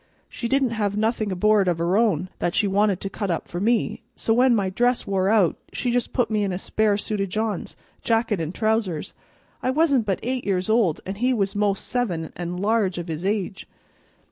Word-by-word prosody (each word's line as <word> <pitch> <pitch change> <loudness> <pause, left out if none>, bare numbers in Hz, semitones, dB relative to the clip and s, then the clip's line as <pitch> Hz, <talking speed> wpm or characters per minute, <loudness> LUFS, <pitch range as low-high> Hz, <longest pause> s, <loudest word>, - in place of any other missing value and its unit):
She 235 - -5
didn't 270 0 +2
have 205 -3 -1
nothing 220 -1 0
aboard, 205 +1 +3
of 175 -2 +1
her 170 +3 +1
own, 190 -6 +2
that 175 - -1
she - - +3
wanted 200 -1 +2
to - - -3
cut 200 -1 -3
up 170 - -2
for 175 - -5
me, 225 +3 +1
so 225 - +1
when 250 +1 +4
my 195 -3 0
dress 245 +5 +1
wore 195 -1 +1
out 205 -6 +3 0.2
she 245 - -1
just 245 -1 0
put 245 -3 0
me 210 -1 +1
into 190 -2 -1
a - - -2
spare 210 +1 +1
suit 210 0 -3
o' - - +1
John's, 215 0 -3 0.2
jacket 225 -5 +1
and 160 0 -3
trousers. 215 -5 -1 0.5
I - - 0
wasn't 275 -5 +2
but 195 - 0
eight 255 +1 -2
years 190 +1 0
old 215 -9 +2
an' 190 - -3
he 255 +1 +3
was 200 -3 -1
most 205 -1 0
seven 180 -11 -2
and 175 +1 -4
large 205 -2 +1
of 170 -1 -5
his 160 +1 -4
age. 200 -1 -2
210 Hz, 215 wpm, -24 LUFS, 185-230 Hz, 0.5 s, when